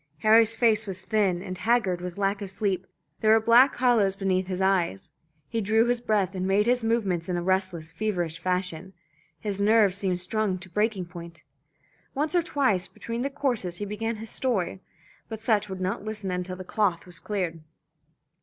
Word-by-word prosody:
Harry's 225 +1 +5
face 220 -2 +3
was 190 -1 -6
thin 195 -5 +1
and 185 -1 -6
haggard 220 -6 +1
with 180 0 -6
lack 200 +1 0
of 200 - -5
sleep, 190 -1 -2 0.3
there 215 - +2
were 225 - +6
black 235 +5 +5
hollows 230 -6 +3
beneath 190 -1 0
his 185 -1 -3
eyes; 185 - 0 0.4
he 225 - -2
drew 220 +3 +3
his 240 0 0
breath 205 -5 +1
and 185 0 -2
made 200 +2 +3
his 245 0 +2
movements 200 -7 0
in 180 - 0
a 175 - -2
restless 185 -3 -1
feverish 175 -3 -2
fashion, 180 0 -2 0.5
his 200 -2 -3
nerves 205 -2 +4
seemed 185 -3 0
strung 200 +1 0
to 185 0 -11
breaking 210 -1 0
point. 170 -2 -10 0.7
Once 300 +4 -1
or 350 - +4
twice 265 - +1
between 230 +1 -6
the 275 - -1
courses 250 -11 -2
he 205 - -4
began 225 +3 -3
his 220 0 -8
story, 195 -7 -1 0.5
but 220 -1 -5
Sutch 215 -3 +1
would 190 -1 -5
not 185 +2 -2
listen 210 -3 -4
until 180 0 -3
the 185 - -8
cloth 185 -3 0
was 180 0 -6
cleared. 180 -4 -3
195 Hz, 185 wpm, -26 LUFS, 185-220 Hz, 0.7 s, were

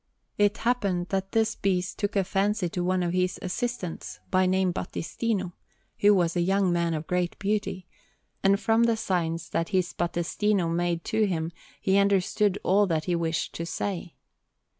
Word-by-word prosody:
It 205 +2 +3
happened 200 -7 0
that 195 0 -2
this 225 0 +2
beast 185 -1 -1
took 205 0 -1
a 195 - +3
fancy 195 +1 0
to 175 +1 -2
one 185 0 +1
of 175 0 -1
his 185 0 +1
assistants, 185 -2 -4
by 185 -1 +3
name 185 -1 +2
Battistino, 190 +1 -3 0.5
who 205 0 +6
was 175 -2 +1
a 175 - +2
young 190 0 +2
man 170 -1 +1
of 155 +1 -4
great 180 0 -1
beauty; 200 -2 -2 0.6
and 195 0 +4
from 225 +1 +3
the 230 -1 +2
signs 165 -6 -1
that 165 - -1
his 185 -2 0
Battistino 175 +2 0
made 170 -1 0
to 220 -1 +1
him 165 -3 -2 0.3
he 195 +1 +3
understood 200 0 +2
all 200 +2 +4
that 160 -3 0
he 180 - +1
wished 165 -1 -1
to 170 - -4
say. 175 0 -4
185 Hz, 170 wpm, -27 LUFS, 175-205 Hz, 0.6 s, who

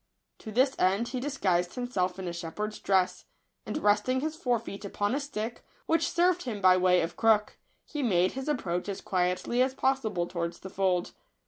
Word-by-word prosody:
To 220 - -8
this 260 +4 +3
end 195 +6 +2
he 255 0 -3
dis 280 +2 -4
guised 175 -4 +1
himself 195 -8 -1
in 190 -1 -5
a 170 - -3
shepherd's 190 +6 -5
dress; 190 -2 +1 0.4
and, - - -2
resting 215 0 +2
his 310 +1 -2
fore 245 -6 +1
feet 210 -3 -8
upon 205 +2 -1
a 280 - +1
stick, 240 -5 -5 0.2
which 325 +1 +2
served 355 +1 +2
him 230 -8 -4
by 185 -1 +6
way 180 -1 +4
of 165 - -3
crook, 215 -2 +2 0.3
he 295 - -4
made 185 -7 +3
his 265 +1 -6
approach 180 -10 -1
as 195 - -3
quietly 180 +6 0
as 260 +1 +1
possible 240 -11 0
towards 170 -1 -4
the 190 - -8
fold. 185 -2 0
210 Hz, 195 wpm, -29 LUFS, 185-255 Hz, 0.4 s, by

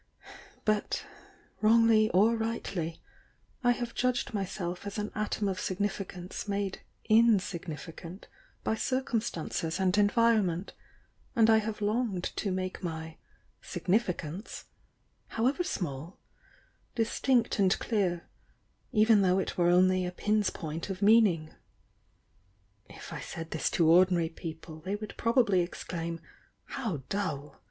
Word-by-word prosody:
But, 215 -1 0 0.6
wrongly 220 0 +5
or 215 +5 +4
rightly, 200 -7 -3 0.6
I 245 - +4
have 240 -1 -5
judged 250 -1 0
myself 190 -2 -3
as 200 +2 -5
an 210 0 -3
atom 215 -1 -1
of 190 -1 -2
significance 195 -1 -3
made 200 -1 -2 0.3
insignifi 190 -8 +2
cant 180 +3 -10 0.4
by - - +1
circumstances 220 - -2
and 185 -1 +2
environm.ent, 205 -4 +2 0.6
and 225 -1 +5
I 220 - +7
have 215 0 -4
longed 210 -3 0
to 200 - -1
make 185 0 -3
my 160 -2 -5 0.4
'significance,' 185 -2 -2 0.6
however 260 +10 0
small, 160 - -4 0.8
dis 230 -1 -1
tinct 245 -4 +2
and 190 -2 +4
clear, 185 -7 -1 0.6
even 215 -2 +5
though 185 -1 +3
it 190 - -2
were 175 -1 +3
only 185 +1 +4
a - - -3
pin's 210 +3 +1
point 160 +2 -5
of 195 +1 -4
meaning. 200 -8 +4 1.4
If - - -10
I - - -5
said 165 0 -7
this 160 - 0
to 165 - +2
ordinary 175 0 +5
people, 160 -1 -8
they 190 +5 -2
would 210 0 -7
probably 230 -5 +3
exclaim 170 -1 -4 0.5
'How 190 - -3
dull!' 150 -8 -3
195 Hz, 125 wpm, -30 LUFS, 175-220 Hz, 1.4 s, I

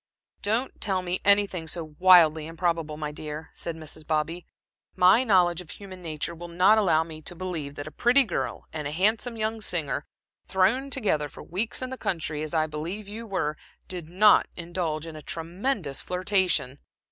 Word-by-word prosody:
"Don't 225 +6 -1
tell 190 -3 0
me 180 0 -2
anything 200 -4 +3
so 155 -2 -4
wildly 165 -4 +6
improbable, 165 -2 -2
my 150 -1 -4
dear," 150 +1 -7
said 170 - -4
Mrs. 155 -1 -7
Bobby. 160 +3 -1 0.5
"My 185 +7 +6
knowledge 180 -6 +3
of 175 - -14
human 190 -2 -10
nature 160 0 -4
will 170 +1 -8
not 185 +6 +4
allow 165 -6 +3
me 160 -1 -9
to 175 +3 -9
believe 165 -6 -5
that 145 - -6
a 155 - -8
pretty 250 - +4
girl 200 -9 -3
and 150 -2 -3
a - - -4
handsome 215 +7 +1
young 220 0 -2
singer, 160 -7 -1 0.4
thrown 210 +9 +2
together 175 - 0
for - - -11
weeks 210 +8 -1
in 255 - -4
the 260 - -5
country, 155 -4 -2
as 155 +1 -4
I 155 -1 +3
believe 165 +7 -5
you 225 +3 -7
were, 165 -7 -2 0.3
did 175 -4 -5
not 205 +4 +5
indulge 170 -3 -3
in 165 -1 -8
a 155 - -8
tremendous 170 - -2
flirtation. 180 -7 +1
175 Hz, 180 wpm, -26 LUFS, 155-200 Hz, 0.5 s, wildly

